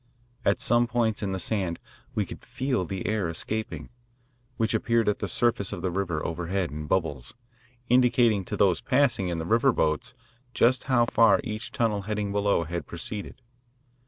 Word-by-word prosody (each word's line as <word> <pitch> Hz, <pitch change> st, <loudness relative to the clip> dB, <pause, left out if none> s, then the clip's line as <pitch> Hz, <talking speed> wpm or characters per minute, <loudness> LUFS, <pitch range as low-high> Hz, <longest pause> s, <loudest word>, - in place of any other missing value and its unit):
At -, -, +2 dB
some 120 Hz, 0 st, +3 dB
points 115 Hz, -2 st, 0 dB
in 100 Hz, -2 st, -2 dB
the 95 Hz, -, -2 dB
sand 90 Hz, -2 st, -1 dB, 0.4 s
we -, -, +1 dB
could -, -, -10 dB
feel 130 Hz, -7 st, -2 dB
the 95 Hz, +2 st, -5 dB
air 105 Hz, -5 st, 0 dB
escaping, 110 Hz, +6 st, -4 dB, 0.7 s
which 115 Hz, -1 st, 0 dB
appeared 115 Hz, +1 st, +1 dB
at 105 Hz, -, +1 dB
the -, -, -2 dB
surface 115 Hz, -5 st, +2 dB
of 85 Hz, -, -5 dB
the 95 Hz, -, 0 dB
river 85 Hz, -4 st, -2 dB
overhead 85 Hz, +2 st, -2 dB
in 75 Hz, 0 st, -6 dB
bubbles, 80 Hz, -, -2 dB, 0.5 s
indicating 120 Hz, -4 st, +4 dB
to -, -, -4 dB
those 95 Hz, -5 st, +3 dB
passing 125 Hz, -8 st, +2 dB
in 85 Hz, -1 st, -2 dB
the 80 Hz, -, -3 dB
river 115 Hz, +8 st, +3 dB
boats 80 Hz, +6 st, -1 dB, 0.4 s
just 125 Hz, +2 st, +3 dB
how 130 Hz, -3 st, +3 dB
far 115 Hz, -2 st, +4 dB
each 110 Hz, -1 st, -5 dB
tunnel 110 Hz, -4 st, 0 dB
heading 105 Hz, 0 st, -3 dB
below 100 Hz, -3 st, +1 dB
had 85 Hz, +2 st, -5 dB
proceeded. 100 Hz, +8 st, -6 dB
105 Hz, 170 wpm, -26 LUFS, 90-115 Hz, 0.7 s, indicating